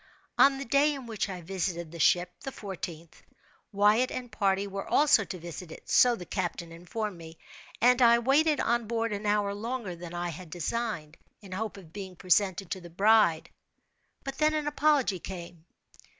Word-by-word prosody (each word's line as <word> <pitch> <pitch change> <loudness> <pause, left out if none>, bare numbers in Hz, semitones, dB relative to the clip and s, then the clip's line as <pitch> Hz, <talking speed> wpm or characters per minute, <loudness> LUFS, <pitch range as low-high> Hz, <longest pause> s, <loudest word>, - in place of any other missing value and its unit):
On 275 0 +5
the 275 - -5
day 285 +4 +3
in 270 -2 -8
which 215 -3 -3
I 185 -2 -6
visited 170 -2 -3
the 170 - -9
ship 175 +3 +3
(the 270 - -6
fourteenth), 180 -7 -8 0.5
Wyatt 210 +5 +3
and 245 -2 -6
party 195 -2 +1
were 195 0 -6
also 290 -7 +5
to 185 - -6
visit 170 0 -8
it—so 245 +8 +3
the 180 - -9
captain 175 -3 -4
informed 180 +3 -5
me—and 220 +9 -1
I 235 -1 +7
waited 285 +5 +3
on 235 -1 +1
board 230 -1 -1
an 205 +1 -4
hour 205 -1 +1
longer 220 -2 -4
than 175 0 -9
I 175 0 -2
had 170 +1 -9
designed, 175 -2 -3 0.2
in 195 -3 -13
hope 210 +2 -4
of 170 -4 -14
being 190 -2 -7
presented 185 0 +1
to 190 - -3
the 175 - -11
bride, 195 -2 +3 0.7
but 270 0 -6
then 310 0 +3
an 305 -1 -1
apology 290 -9 +2
came. 170 -2 -9
200 Hz, 175 wpm, -29 LUFS, 175-235 Hz, 0.7 s, I